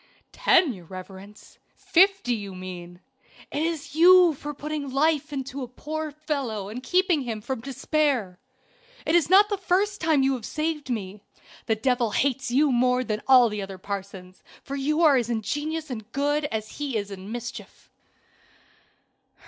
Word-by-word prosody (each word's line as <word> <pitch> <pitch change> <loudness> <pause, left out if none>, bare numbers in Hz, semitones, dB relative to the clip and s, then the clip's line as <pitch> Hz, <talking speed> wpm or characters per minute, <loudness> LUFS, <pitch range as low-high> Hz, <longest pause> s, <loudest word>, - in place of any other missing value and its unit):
"Ten, 355 - +3
your 180 -4 -12
reverence? 190 +3 -12 0.2
Fifty, 380 -7 +3
you 200 -4 -5
mean. 180 -1 -9 0.5
It 290 - -2
is 315 -3 -3
you 355 +1 +7
for 295 +1 -6
putting 295 0 -5
life 305 +2 +1
into 270 -1 -5
a 250 - -4
poor 310 +5 -5
fellow 280 -9 -4
and 235 +4 -6
keeping 360 +2 +2
him 230 -4 -4
from 245 +2 -5
despair. 265 - -1 0.7
It 315 - 0
is 340 -3 +3
not 400 +3 +6
the 410 -2 -2
first 395 +2 0
time 315 -4 +3
you 270 0 +2
have 250 -4 -5
saved 305 +1 -3
me. 205 -4 -4 0.5
The 220 - +2
devil 245 +1 +1
hates 270 +4 0
you 280 +4 +3
more 250 +1 +2
than 215 -3 -3
all 255 -2 +7
the 210 -2 -4
other 195 -1 -7
parsons, 190 -1 -7 0.2
for 275 - -5
you 300 +4 0
are 295 -4 +6
as 240 -2 -1
ingenious 295 +7 -3
in 240 - -3
good 285 +7 -1
as 220 -5 -5
he 280 -5 -2
is 205 -1 -4
in 195 +1 -8
mischief." 240 0 -8
265 Hz, 165 wpm, -25 LUFS, 215-305 Hz, 0.7 s, you